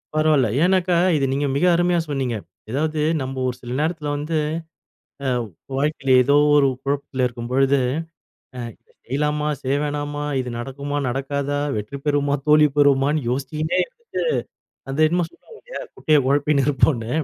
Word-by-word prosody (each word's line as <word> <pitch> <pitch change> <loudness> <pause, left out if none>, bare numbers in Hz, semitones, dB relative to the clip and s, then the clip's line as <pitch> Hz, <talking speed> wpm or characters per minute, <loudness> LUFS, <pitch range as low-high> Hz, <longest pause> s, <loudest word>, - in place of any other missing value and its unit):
பரவால்ல 155 -5 +3 0.2
ஏன்னாக்கா 185 -1 +3 0.2
இத 140 - +1
நீங்க 140 +1 0
மிக 150 +6 +2
அருமையா 175 0 +2
சொன்னிங்க. 130 -4 -1 0.4
எதாவது 155 +3 -1 0.2
நம்ம 130 +1 -4
ஒரு 125 - -2
சில 120 0 -7
நேரத்துல 155 0 -1
வந்து, 155 +2 -2 0.9
அ - - +1 0.5
வாழ்க்கைல 140 -1 -1
ஏதோ 140 +3 +3 0.2
ஒரு 140 -2 +5 0.2
குழப்பத்துல 135 -2 -1
இருக்கும்பொழுது, 130 +3 +1 0.8
"அ - - -6 0.2
இத - - -46 0.2
செய்யலாமா 150 +3 0
செய்ய 135 +1 0
வேணாமா? 145 0 -3 0.2
இது 125 - -4
நடக்குமா 140 +4 -4
நடக்காதா? 140 +2 -2 0.2
வெற்றி 105 +7 -5
பெறுவோமா 145 -1 +2
தோல்வி 150 0 +6
பெறுவோமான்னு?" 140 0 +3
யோசிச்சிகின்னே 145 +5 -1
இருந்துட்டு, - - -25 0.9
அந்த 135 - -4
என்னமோ 175 +1 +1
சொல்லுவாங்க 450 - -17
இல்லையா - - -7
"குட்டையை 155 -2 +3
குழப்பினு 140 0 +2
இருப்போம்னு." 130 -5 +2
145 Hz, 140 wpm, -22 LUFS, 135-150 Hz, 0.9 s, தோல்வி